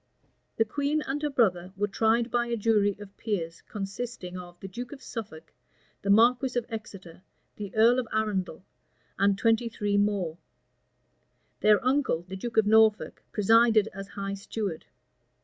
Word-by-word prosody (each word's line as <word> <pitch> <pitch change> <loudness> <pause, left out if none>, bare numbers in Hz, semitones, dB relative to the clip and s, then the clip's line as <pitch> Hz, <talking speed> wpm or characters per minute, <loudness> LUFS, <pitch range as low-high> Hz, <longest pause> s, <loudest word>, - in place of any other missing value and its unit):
The 225 - +3
queen 290 +6 -1
and 280 +2 -3
her 300 - 0
brother 190 -9 +1
were 205 +1 +1
tried 225 +3 +1
by 240 0 +1
a 235 0 -1
jury 205 -2 +2
of 200 -1 -11
peers 170 -7 -3
consisting 195 -2 -5
of 175 -1 -9
the 195 - -7
duke 240 +6 -7
of 290 - -9
Suffolk, 185 -9 -8 0.5
the 200 - -4
marquis 245 +4 +4
of 240 - 0
Exeter, 195 -6 -8 0.4
the 205 -1 -7
earl 235 +3 +5
of 245 - -3
Arundel, 195 -5 -2 0.5
and 200 0 +3
twenty 230 +2 +2
three 205 -3 -1
more: 195 -5 0 1.2
their 210 +1 +4
uncle, 260 - +1
the 190 - -6
duke 225 +4 -6
of 220 - +5
Norfolk, 220 0 +3
presided 225 0 +4
as 195 0 -7
high 195 0 -5
steward. 200 -3 -5
215 Hz, 155 wpm, -27 LUFS, 195-235 Hz, 1.2 s, earl